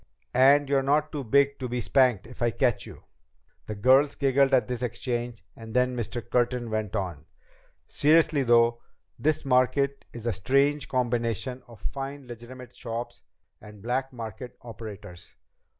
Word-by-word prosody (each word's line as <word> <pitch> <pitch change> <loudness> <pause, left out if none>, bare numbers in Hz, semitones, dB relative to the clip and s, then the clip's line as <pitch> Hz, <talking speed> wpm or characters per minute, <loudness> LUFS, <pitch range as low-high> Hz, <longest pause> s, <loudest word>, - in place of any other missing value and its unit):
"And 140 +3 +5
you're 135 0 +2
not 150 +3 +1
too 145 -3 -4
big 140 +4 +2
to 130 -2 -4
be 125 +1 -2
spanked 125 -3 +2
if 120 +2 -13
I 120 - +3
catch 120 -1 0
you." - - -12 0.6
The 110 - -4
girls 130 +7 +4
giggled 135 0 +2
at 125 -5 +3
this 125 -1 -4
exchange, 120 -1 -3
and 115 0 -10
then 125 0 +2
Mr. 120 0 -4
Curtin 120 -1 0
went 110 -2 -2
on: 85 -7 -4 0.6
"Seriously 155 0 +3
though, 120 -1 +3 0.4
this 155 0 0
market 135 +2 +1
is 120 -1 -9
a 120 - 0
strange 140 +9 +1
combination 120 0 -1
of 115 -4 -14
fine 140 0 -6
legitimate 125 +1 -11
shops 120 0 -6 0.4
and 105 -1 -13
black 130 +3 -1
market 120 0 -8
operators. 105 -7 -10
125 Hz, 150 wpm, -27 LUFS, 115-135 Hz, 0.6 s, And